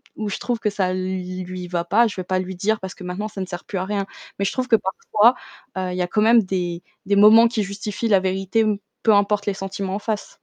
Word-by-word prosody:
où 215 -2 -3
je - - -3
trouve 240 -2 -2
que 210 - 0
ça 190 -3 -1
l 185 0 -3
lui 180 0 -7
va 170 -1 -2
pas, 225 +7 +3
je 205 - -6
vais 185 - -4
pas 185 +1 -1
lui 185 0 -5
dire 210 +4 0
parce 190 0 -7
que 185 - -11
maintenant 180 +4 -4
ça 200 -2 -7
ne - - -2
sert 175 0 -7
plus 195 - -4
à - - -1
rien, 200 -1 -2 0.3
mais 200 - +1
je - - 0
trouve 255 -1 -2
que 225 - +6
parfois, 210 +5 +2 0.4
heu, 185 -1 -2
il - - -4
y - - 0
a 175 - 0
quand 210 +3 0
même 230 +1 +6
des 180 -2 -3 0.2
des 200 +1 +2
moments 220 +3 +8
qui 220 -3 -1
justifient 205 +3 -4
la 200 -3 +5
vérité, 190 +3 0
m 215 -2 +1 0.3
peu 220 - +5
importe 205 0 +2
les 200 - +1
sentiments 195 0 -4
en - - -3
face. 215 -1 -3
195 Hz, 275 wpm, -22 LUFS, 185-215 Hz, 0.4 s, moments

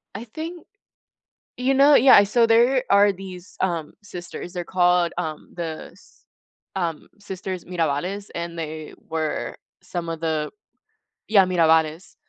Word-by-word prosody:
I 230 - -5
think 320 +8 -8 0.9
You 260 +2 +1
know, 280 +2 +6
yeah, 255 -6 +8
so 230 +3 +3
there 245 +3 +4
are 200 +1 +6
these, 185 -1 -11
um, 170 -5 -1
sisters, 180 -2 -8
they're 175 -1 -3 0.2
called, 175 -1 +4
um, 155 -3 -4
the 165 -2 -5
S - - -23 0.5
um, 165 -4 -3
Sisters 190 -2 -6
Mirabales, 180 +4 -2
and 170 0 -5
they 155 -1 -6 0.2
were 160 -1 -2 0.3
some 175 -1 -5
of 165 - -4
the 155 -2 -1 0.8
Yeah, 200 -3 +5
Mirabales, 160 -1 +2
180 Hz, 130 wpm, -23 LUFS, 165-205 Hz, 0.9 s, yeah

